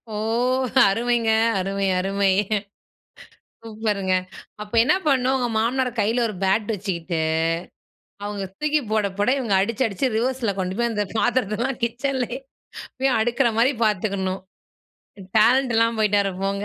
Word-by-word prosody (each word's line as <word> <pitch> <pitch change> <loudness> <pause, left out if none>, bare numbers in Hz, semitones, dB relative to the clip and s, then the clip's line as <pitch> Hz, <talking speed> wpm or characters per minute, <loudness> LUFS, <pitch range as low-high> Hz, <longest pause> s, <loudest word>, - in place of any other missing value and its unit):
ஓ, - - -3 0.7
அருமைங்க. 230 +2 +1 0.3
அருமை, 195 +1 -2
அருமை. 195 +1 +1 1.3
சூப்பருங்க! 210 -4 -2 0.5
அப்ப 210 0 -8
என்ன 245 - +3
பண்ணணும் 265 -2 +2
உங்க 250 -2 -1
மாமனாரா 250 +3 0
கையில 225 +4 +1
ஒரு 215 - -6
பேட் 195 +3 +2
வச்சுக்கிட்டு 180 -4 -3 1.1
அவங்க 205 -1 -4 0.2
தூக்கி 300 0 +1
போட, 215 -1 +1
போட 205 +4 +1
இவங்க 230 -7 0
அடிச்சு, 230 +6 0
அடிச்சு 220 +5 -1
ரிவர்ஸ்ல 245 -2 0
கொண்டு 185 0 -2
போய். 235 0 +1
அந்த 210 -1 -1
பாத்திரத்தலாம் 240 +2 0
கிச்சன்லேயே 250 +1 -2 0.6
போய் 265 0 +1
அடுக்குற 240 +3 +2
மாரி 245 +4 +4
பார்த்துக்கணும். 195 -2 -1 1.0
டேலண்ட் 245 +3 +4
இல்லாம 230 0 +2
போய்ட்டாரு 200 -2 +2
போங்க. 200 +1 -2
220 Hz, 125 wpm, -23 LUFS, 200-245 Hz, 1.3 s, மாரி